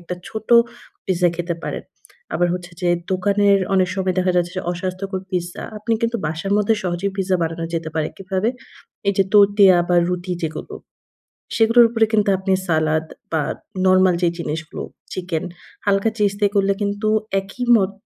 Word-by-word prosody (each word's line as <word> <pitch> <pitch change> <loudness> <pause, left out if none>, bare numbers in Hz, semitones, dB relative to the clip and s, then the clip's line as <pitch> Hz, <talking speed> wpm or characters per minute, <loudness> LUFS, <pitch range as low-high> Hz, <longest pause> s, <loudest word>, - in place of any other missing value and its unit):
একটা 175 +1 -5
ছোট 220 -1 -7 0.6
পিজ্জা 180 -2 +2
খেতে 175 -1 -3
পারেন। - - -4 0.5
আবার 175 0 +2
হচ্ছে 180 -1 -7
যে 175 - +2 0.2
দোকানের 200 +1 +3 0.2
অনেক 185 -1 +3
সময় 190 -2 -1
দেখা 185 0 +2
যাচ্ছে 175 0 +1
যে 185 - -2
অস্বাস্থ্যকর 185 +1 -4
পিজ্জা। 175 -2 -3 0.2
আপনি 225 +2 -2
কিন্তু 230 0 +1
বাসার 160 +5 -3
মধ্যে 210 +2 +3
সহজেই 185 +2 -2
পিজ্জা 190 -1 +1
বানানো 165 0 -2
যেতে 165 -1 -2
পারে। 155 -1 0
কিভাবে? 195 +3 -1 0.6
এই - - +4
যে 195 - +5
তোতিয়া 200 -2 +6
বা 175 - +3
রুটি 180 0 -3
যেগুলো। 160 -1 -5 0.8
সেগুলোর 230 +1 +6
উপরে 225 -1 +3
কিন্তু 210 -2 +3
আপনি 190 +1 -2 0.2
সালাদ 155 -1 +1 0.3
বা 160 -2 +1 0.4
নরমাল 185 -1 +5
যে - - +5
জিনিসগুলো 160 0 -4 0.3
চিকেন 180 -3 -3 0.4
হালকা 200 +2 +2
চিজ 205 -2 +2
দিয়ে 205 -1 +2
করলে 200 0 +3
কিন্তু 205 +1 -1 0.3
একই 195 +6 -7
মত 195 -2 0
185 Hz, 165 wpm, -21 LUFS, 175-200 Hz, 0.8 s, তোতিয়া